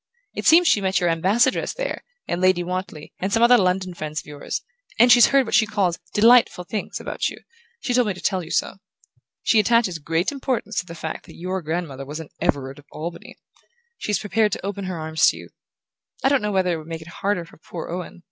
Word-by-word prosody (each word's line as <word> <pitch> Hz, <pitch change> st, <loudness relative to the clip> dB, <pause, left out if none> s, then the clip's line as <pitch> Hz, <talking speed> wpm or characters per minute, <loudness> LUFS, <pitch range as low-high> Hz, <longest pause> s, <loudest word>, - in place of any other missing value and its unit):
It -, -, -3 dB
seems 340 Hz, +2 st, +7 dB
she 205 Hz, -, +4 dB
met 190 Hz, -1 st, +1 dB
your 175 Hz, -1 st, +2 dB
Ambassadress 205 Hz, +10 st, +1 dB
there, -, -, -4 dB, 0.2 s
and 175 Hz, -, -2 dB
Lady 185 Hz, -1 st, +3 dB
Wantley, 180 Hz, -4 st, -5 dB
and 190 Hz, +2 st, -2 dB
some 230 Hz, +2 st, +3 dB
other 245 Hz, +1 st, +7 dB
London 185 Hz, -1 st, 0 dB
friends 155 Hz, -2 st, -4 dB
of -, -, -11 dB
yours, 145 Hz, -1 st, -5 dB, 0.3 s
and 240 Hz, +2 st, +6 dB
she's 240 Hz, -1 st, +8 dB
heard 275 Hz, -1 st, +3 dB
what -, -, -6 dB
she 220 Hz, 0 st, +5 dB
calls 195 Hz, -5 st, 0 dB, 0.2 s
'delightful 230 Hz, -4 st, +5 dB
things' 210 Hz, +3 st, -4 dB
about -, -, -2 dB
you: -, -, -10 dB, 0.4 s
she 250 Hz, -, -1 dB
told 250 Hz, -2 st, +3 dB
me 200 Hz, -, -1 dB
to -, -, -10 dB
tell 190 Hz, -3 st, -1 dB
you 160 Hz, -, -10 dB
so. -, -, -1 dB, 0.7 s
She 225 Hz, -, +4 dB
attaches 215 Hz, -5 st, +2 dB
great 165 Hz, -, 0 dB
importance 260 Hz, -6 st, -2 dB
to 180 Hz, -, -6 dB
the 170 Hz, -, -8 dB
fact 160 Hz, -1 st, -6 dB
that -, -, -13 dB
your 185 Hz, +2 st, -3 dB
grandmother 160 Hz, -4 st, -4 dB
was 150 Hz, +3 st, -7 dB
an 160 Hz, -, -9 dB
Everard 135 Hz, 0 st, -1 dB
of 145 Hz, -, -17 dB
Albany. 170 Hz, +2 st, -7 dB, 0.6 s
She's 210 Hz, -, 0 dB
prepared 215 Hz, 0 st, +1 dB
to -, -, -4 dB
open 200 Hz, -1 st, -4 dB
her 185 Hz, -2 st, -4 dB
arms 160 Hz, 0 st, +2 dB
to -, -, +2 dB
you. -, -, -11 dB, 0.7 s
I 270 Hz, -, +4 dB
don't 280 Hz, -1 st, +3 dB
know 210 Hz, 0 st, -1 dB
whether 185 Hz, -2 st, +1 dB
it -, -, -2 dB
won't 155 Hz, +1 st, -10 dB
make 165 Hz, -1 st, -5 dB
it -, -, -17 dB
harder 195 Hz, -4 st, 0 dB
for -, -, -18 dB
poor 165 Hz, +1 st, -8 dB
Owen 180 Hz, 0 st, -6 dB
185 Hz, 225 wpm, -23 LUFS, 165-220 Hz, 0.7 s, she's